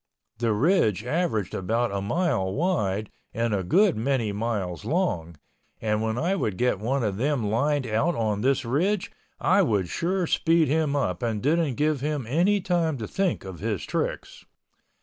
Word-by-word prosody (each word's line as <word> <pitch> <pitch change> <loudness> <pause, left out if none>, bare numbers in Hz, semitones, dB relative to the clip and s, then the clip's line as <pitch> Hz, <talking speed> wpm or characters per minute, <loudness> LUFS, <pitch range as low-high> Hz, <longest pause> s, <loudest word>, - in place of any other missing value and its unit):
The 115 -2 +1
ridge 110 - +2
averaged 125 - -1
about 115 +5 0
a 100 0 -2
mile 115 - 0
wide 110 - -1 0.2
and 115 0 0
a 100 - +1
good 185 - +3
many 115 -2 0
miles 100 -4 -3
long, 105 - -1 0.4
and 105 -1 0
when 110 +1 -1
I 175 +8 +1
would 105 - -2
get 125 -5 +1
one 125 +5 -1
of 100 -3 -1
them 125 -4 0
lined 145 +4 +1
out 120 +10 +1
on 105 -3 -1
this 135 +2 +1
ridge 180 - 0 0.3
I 190 +3 +4
would 105 - +1
sure 180 +2 0
speed 165 -1 +2
him 150 -1 +1
up 90 -11 -1
and 115 -3 -1
didn't 150 +1 +1
give 150 -1 0
him 150 -3 -2
any 180 - +2
time 170 -5 0
to 110 -3 -5
think 190 - -1
of 95 -3 -8
his 105 -2 -2
tricks. - - -3
125 Hz, 170 wpm, -25 LUFS, 105-160 Hz, 0.4 s, I